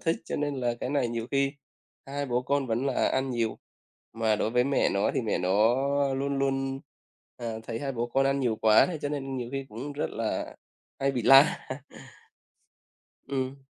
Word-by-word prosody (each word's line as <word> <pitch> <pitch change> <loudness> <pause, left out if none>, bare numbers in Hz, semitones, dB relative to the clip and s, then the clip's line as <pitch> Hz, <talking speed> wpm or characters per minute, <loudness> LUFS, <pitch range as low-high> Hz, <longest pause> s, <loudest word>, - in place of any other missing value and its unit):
thích 165 -1 +1
cho - - -4
nên 145 -1 -1
là 120 -1 0
cái 125 - -2
này 140 -4 +1
nhiều 115 -1 -3
khi 140 0 +1 0.5
hai 140 +1 -3
bố 125 -1 0
con 140 +1 0
vẫn 120 +3 -1
là 135 - +1
ăn 130 0 0
nhiều. 115 -3 -1 0.5
Mà 110 -1 +1
đối 110 - 0
với 125 +1 +3
mẹ 140 0 +2
nó 100 +1 +1
thì - - +1
mẹ 115 -3 -1
nó 105 +6 +3 0.4
luôn 140 +1 -1
luôn, 135 0 -1 0.6
à, 115 -2 -4
thấy 115 0 -5
hai 140 -1 -2
bố 120 -1 -2
con 135 +3 +1
ăn 135 0 +1
nhiều 120 -4 +1
quá 110 0 +5
hay 175 -3 -4
cho 145 - -1
nên 135 -2 -4
nhiều 120 -2 -4
khi 135 0 -3
cũng 130 +7 -6
rất 145 - -3
là - - -3 0.4
hay 135 0 +1
bị 125 -3 -2
la. 135 +4 +6 1.6
Ừm. 135 0 -3
130 Hz, 195 wpm, -28 LUFS, 115-140 Hz, 1.6 s, la